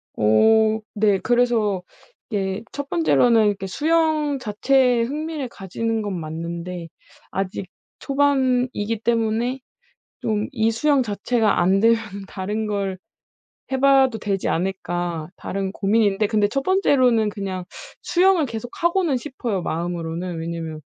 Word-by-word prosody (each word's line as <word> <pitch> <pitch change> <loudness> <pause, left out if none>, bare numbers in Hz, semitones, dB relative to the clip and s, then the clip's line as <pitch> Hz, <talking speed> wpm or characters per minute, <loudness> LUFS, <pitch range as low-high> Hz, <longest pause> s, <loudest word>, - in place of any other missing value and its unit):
어 220 - +4
네. 205 -2 +3
그래서 235 -6 +1 0.5
이게 195 -1 -2
1 285 0 -5
번째로는 230 - +3
그 195 - -4
수영 310 - +1
자체에 250 +2 +2
흥미를 295 0 -4
가지는 225 +3 -3
건 190 -4 -3
맞는데 170 +2 -5 0.4
아직 195 0 -3 0.3
초반이기 255 -6 +1
때문에 235 +2 0 0.6
좀 215 -1 -1
'이 225 -2 +1
수영 280 +3 +2
자체가 215 0 0
안되면은 200 +1 +2
다른 210 +3 -3
걸 195 -2 -2 0.7
해 265 - 0
봐도 270 -4 +4
되지 195 -2 -2
않을까?' 175 -2 -2
다른 195 -1 -3
고민인데 205 0 +2
근데 210 -2 +2
1 275 +6 -1
번째로는 255 - +3
그냥 190 -3 -5 0.4
수영을 360 -3 +3
계속하고는 270 - -1
싶어요 240 -8 -4
마음으로는. 170 +1 -3
왜냐면 165 -2 -5
220 Hz, 260 characters per minute, -22 LUFS, 190-255 Hz, 0.7 s, 어